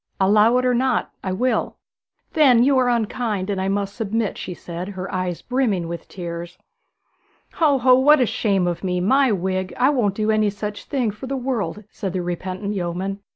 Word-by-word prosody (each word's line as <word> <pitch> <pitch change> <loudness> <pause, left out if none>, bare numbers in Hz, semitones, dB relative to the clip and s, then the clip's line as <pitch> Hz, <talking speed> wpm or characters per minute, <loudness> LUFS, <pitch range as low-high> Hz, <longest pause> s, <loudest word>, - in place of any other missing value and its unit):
'Allow 210 +5 +4
it 255 - +1
or 250 - +3
not, 255 0 0
I 190 - -2
will.' 250 +7 -1 0.6
'Then 260 -7 +5
you 275 +1 +4
are 250 -1 +2
unkind, 220 -4 -1
and 190 -1 -2
I 190 - -1
must 200 0 -1
submit,' 225 -1 -1
she 180 - -6
said, 175 +1 -7
her 190 -1 -6
eyes 185 -2 -3
brimming 230 -9 0
with 170 -1 -6
tears. 170 -1 -7 1.0
'Ho, 300 -4 +3
ho; 255 0 +5
what 295 +3 +6
a 250 - +4
shame 200 -4 0
of 175 +1 -2
me! 180 -1 0
My 260 +7 +3
wig, 185 -1 -2
I 255 +3 +4
won't 215 -8 +1
do 215 +1 +1
any 215 -1 +2
such 205 +1 -6
thing 255 -7 -1
for 215 +6 -9
the 275 +1 -2
world,' 240 -5 -3
said 195 -4 -5
the 185 -2 -2
repentant 185 +3 -4
yeoman. 190 +1 -3
205 Hz, 195 wpm, -22 LUFS, 185-245 Hz, 1.0 s, what